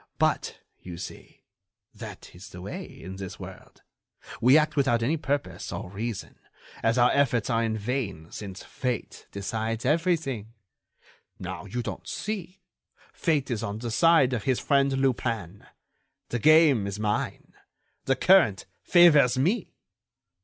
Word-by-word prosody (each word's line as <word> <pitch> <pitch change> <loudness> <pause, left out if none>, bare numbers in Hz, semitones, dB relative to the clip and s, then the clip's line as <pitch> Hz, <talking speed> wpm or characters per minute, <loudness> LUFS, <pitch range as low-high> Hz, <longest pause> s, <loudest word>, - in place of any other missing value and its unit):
But, - - 0 0.2
you 90 -2 -8
see, 85 - -10 0.5
that - - -10
is 90 +2 -12
the 90 - -10
way 100 - -6
in 95 +2 -10
this 95 -2 -7
world, - - -12 0.6
we 130 +5 +7
act 155 0 +1
without 120 -5 +2
any 145 +8 +1
purpose 145 -2 -3
or 90 - -6
reason, 110 +1 -5 0.4
as 115 +2 +2
our 120 0 +5
efforts 125 -5 +1
are 115 0 +2
in 110 -1 -1
vain 105 -8 -4
since 95 -3 -8
Fate 125 -3 -4
decides 110 +3 -3
everything. 150 - 0 0.8
Now, - - -7
don't 120 +4 -4
you - - -30
see, 195 -3 -5 0.5
Fate 145 -6 0
is 110 -3 -1
on 105 -2 -4
the 115 +1 -5
side 160 -1 +4
of 115 -5 -3
his 130 -2 +1
friend 140 -1 +2
Lupin. 115 -8 -2 0.6
The 120 - -2
game 150 -6 +5
is 100 +1 -5
mine! 105 -1 -2 0.5
The 135 - +2
current 150 - +4 0.2
favors 150 -8 +6
me!" 180 - 0
120 Hz, 140 wpm, -27 LUFS, 105-145 Hz, 0.8 s, we